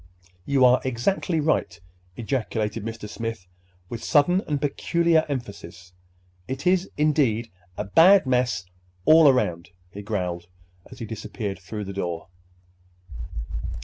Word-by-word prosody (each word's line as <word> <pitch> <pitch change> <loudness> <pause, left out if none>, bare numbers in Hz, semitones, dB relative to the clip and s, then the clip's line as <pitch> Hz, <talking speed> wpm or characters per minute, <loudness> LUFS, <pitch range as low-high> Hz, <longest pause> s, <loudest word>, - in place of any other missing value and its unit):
"You 135 -2 +4
are 125 0 +5
exactly 145 +7 0
right!" 145 - 0 0.4
ejaculated 110 -3 -2
Mr. 115 -1 -6
Smith 115 -3 -5 0.4
with 115 +3 -7
sudden 175 +6 +3
and 145 -2 -1
peculiar 160 +3 +1
emphasis. 95 -8 -7 0.5
"It 130 +1 -5
is, 185 +1 +2
indeed, 135 -7 +1 0.3
a - - -2
bad 170 - +6
mess 125 -7 0 0.4
all 160 -1 +7
around," 90 -10 0 0.2
he 100 - -8
growled 90 -5 -3 0.4
as - - -12
he 115 - -6
disappeared 105 -2 -5
through 105 +3 -6
the 100 - -6
door. 85 -2 -4
115 Hz, 120 wpm, -24 LUFS, 100-145 Hz, 0.5 s, all